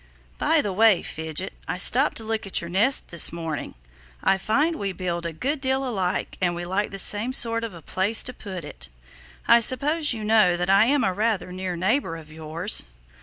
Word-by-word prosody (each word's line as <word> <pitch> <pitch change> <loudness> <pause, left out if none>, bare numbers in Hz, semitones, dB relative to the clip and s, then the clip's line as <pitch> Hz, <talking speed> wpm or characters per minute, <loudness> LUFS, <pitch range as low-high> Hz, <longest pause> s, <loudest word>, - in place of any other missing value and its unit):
By 320 -1 +2
the 200 - -3
way, 215 -2 +3
Fidget, 160 +4 -4
I - - -3
stopped 260 +10 +3
to 225 - -2
look 220 -2 -4
at 195 - +1
your 170 0 -8
nest 225 +9 +1
this 170 - +4
morning. 165 -3 -6 0.5
I 195 - +2
find 295 - 0
we 195 -1 -4
build 175 -2 -4
a - - -5
good 270 - -3
deal 265 0 -1
alike 190 -6 -3
and 175 -1 0
we 175 0 -6
like 195 +4 -2
the 195 - -7
same 210 +6 +3
sort 230 -2 +3
of 220 -6 -6
a 165 - -13
place 200 +4 +3
to 255 - -3
put 190 -8 -8
it. 70 - -9 0.6
I 235 - +6
suppose 290 +6 +3
you 225 -3 -5
know 210 -5 +3
that 180 +2 -1
I 200 +3 +5
am 280 +2 +1
a 190 - 0
rather 210 -2 -2
near 185 -1 -5
neighbor 190 +1 -1
of 155 -2 -12
yours?" 160 - -2
195 Hz, 210 wpm, -23 LUFS, 175-230 Hz, 0.6 s, I